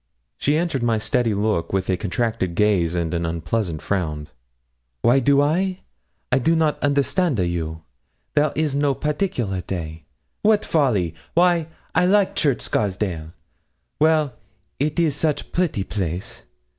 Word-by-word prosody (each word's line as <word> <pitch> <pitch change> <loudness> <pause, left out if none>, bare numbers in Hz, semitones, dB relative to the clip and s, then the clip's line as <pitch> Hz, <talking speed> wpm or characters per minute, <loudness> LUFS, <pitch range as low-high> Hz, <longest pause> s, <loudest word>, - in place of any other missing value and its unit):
She 145 +2 +2
answered 165 -6 -1
my 115 -1 +2
steady 115 -1 +1
look 105 -4 0
with 95 -1 0
a 95 - +2
contracted 100 -2 -2
gaze 90 -4 +2
and 85 -1 -1
an 85 0 -1
unpleasant 85 +1 -2
frown. 75 -6 -2 0.7
'Wy 120 +3 +5
do 140 +2 +4
I? 185 +5 0 0.5
I 130 - +4
do 165 +6 +2
not 160 -2 +1
understand 145 - +1
a 90 - +2
you; 80 -2 -3 0.5
there 150 -1 +3
is 155 -2 0
no 140 -1 +1
particular 130 - -1
day 80 -3 -6 0.4
wat 210 0 +3
folly! 110 - +1 0.2
Wy 175 -2 +4 0.3
I 180 - +3
like 200 0 +3
Church 140 -6 +1
Scarsdale? 95 -6 -2 0.7
Well, 155 -3 +3 0.5
it 150 +3 0
is 160 -5 +2
such 150 0 -1
pretty 170 - 0
place. 95 -3 -4
120 Hz, 145 wpm, -22 LUFS, 90-150 Hz, 0.7 s, Wy